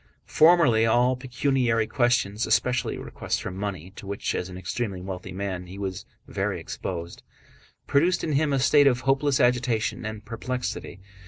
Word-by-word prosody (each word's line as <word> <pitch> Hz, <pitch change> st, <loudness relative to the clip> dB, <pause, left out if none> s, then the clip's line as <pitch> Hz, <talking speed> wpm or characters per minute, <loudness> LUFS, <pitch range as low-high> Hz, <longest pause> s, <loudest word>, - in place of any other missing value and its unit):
Formerly 155 Hz, -9 st, +5 dB
all 120 Hz, +3 st, +3 dB
pecuniary 125 Hz, -3 st, 0 dB
questions, 115 Hz, -4 st, +1 dB
especially 125 Hz, 0 st, +1 dB
requests -, -, -3 dB
for -, -, -5 dB
money 95 Hz, -2 st, -5 dB
to 100 Hz, -, -9 dB
which, 100 Hz, 0 st, -2 dB
as 90 Hz, -, -3 dB
an 90 Hz, -, -8 dB
extremely 95 Hz, +2 st, -3 dB
wealthy 90 Hz, 0 st, -7 dB
man, 95 Hz, -1 st, -4 dB
he 95 Hz, +2 st, -9 dB
was 95 Hz, -2 st, -5 dB, 0.2 s
very -, -, -2 dB
exposed, 85 Hz, -2 st, -6 dB, 0.6 s
produced 165 Hz, +6 st, +2 dB
in 160 Hz, -, -1 dB
him 145 Hz, +1 st, +2 dB
a 135 Hz, -, +2 dB
state 140 Hz, +2 st, +5 dB
of 125 Hz, -2 st, +2 dB
hopeless 135 Hz, +1 st, +2 dB
agitation 120 Hz, -3 st, +1 dB
and 110 Hz, 0 st, -6 dB
perplexity. 125 Hz, -4 st, -5 dB
115 Hz, 155 wpm, -25 LUFS, 95-130 Hz, 0.6 s, Formerly